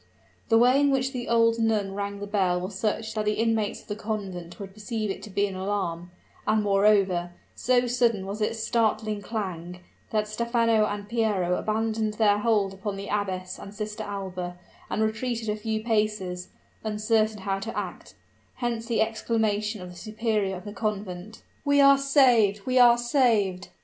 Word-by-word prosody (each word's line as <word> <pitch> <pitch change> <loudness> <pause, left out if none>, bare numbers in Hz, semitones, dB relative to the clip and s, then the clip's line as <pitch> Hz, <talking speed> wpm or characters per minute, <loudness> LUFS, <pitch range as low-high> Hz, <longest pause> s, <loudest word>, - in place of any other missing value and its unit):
The 225 - +5
way 250 +4 +5
in 285 - +4
which 265 -1 +1
the 245 -2 -4
old 230 0 +3
nun 215 -3 +1
rang 200 0 -4
the 205 - -4
bell 190 -3 +1
was 185 +3 -5
such 215 +2 -2
that 215 - -1
the 210 0 +1
inmates 225 -2 0
of - - -25
the 205 - -3
convent 195 -5 -5
would 195 -1 -8
perceive 215 0 -3
it - - -6
to 215 - -9
be 200 +1 +1
an 195 -2 -5
alarm; 185 -3 -2 0.4
and 215 -1 +3
moreover, 195 -3 +3 0.2
so 250 0 +2
sudden 235 -5 +1
was 200 +3 -5
its 225 +1 -1
startling 215 -2 0
clang, 180 -5 -5 0.3
that 215 -1 0
Stephano 230 0 +2
and 205 -1 -5
Piero 210 -6 +1
abandoned 220 0 -1
their 210 -2 +3
hold 210 -3 +1
upon 195 +1 -4
the 200 +1 -6
abbess 185 -3 -2
and 200 +1 -10
Sister 215 +1 -5
Alba, 185 -4 -5 0.3
and 220 - 0
retreated 225 +1 -2
a 210 - 0
few 215 0 -3
paces, 210 -5 -1 0.4
uncertain 215 0 +1
how 195 0 -1
to 225 +3 -6
act; - - -6 0.4
hence 235 -2 -3
the 235 -2 +1
exclamation 220 -2 0
of 180 - -8
the - - -12
superior 215 0 -1
of 180 - -9
the 205 - -6
convent, 210 -2 -4 0.2
"We 285 -1 +3
are 275 0 +7
saved! 245 -8 +4
we 255 0 +2
are 240 -1 +7
saved!" 225 -7 +1
215 Hz, 175 wpm, -26 LUFS, 195-225 Hz, 0.4 s, are